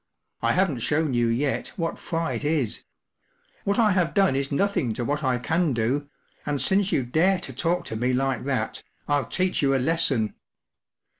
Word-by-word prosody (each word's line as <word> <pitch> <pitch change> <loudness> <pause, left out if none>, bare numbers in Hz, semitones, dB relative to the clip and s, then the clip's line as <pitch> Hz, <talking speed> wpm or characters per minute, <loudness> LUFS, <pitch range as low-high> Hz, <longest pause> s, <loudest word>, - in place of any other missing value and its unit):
“I - - +2
haven’t 180 -9 +1
shown 150 +2 +1
you 120 -1 +2
yet 135 - -1
what 165 -5 -3
fright 165 -2 -2
is; 145 -7 -1 0.8
what 200 0 +1
I 220 -3 +4
have 180 -2 +1
done 195 -8 +4
is 135 0 -1
nothing 145 - +1
to 120 - -2
what 145 +3 -1
I 130 -2 +2
can 160 +4 0
do, 130 +6 -1 0.3
and 145 -1 -2
since 195 +4 +2
you 135 - +2
dare 165 +10 +2
to 130 - -5
talk 170 +7 0
to - - -5
me 125 +3 0
like 135 +1 0
that, 135 -2 -2 0.3
Ill 145 -3 +1
teach 185 +8 0
you 135 -1 +3
a - - +4
lesson." 135 -5 +2
145 Hz, 180 wpm, -25 LUFS, 130-175 Hz, 0.8 s, I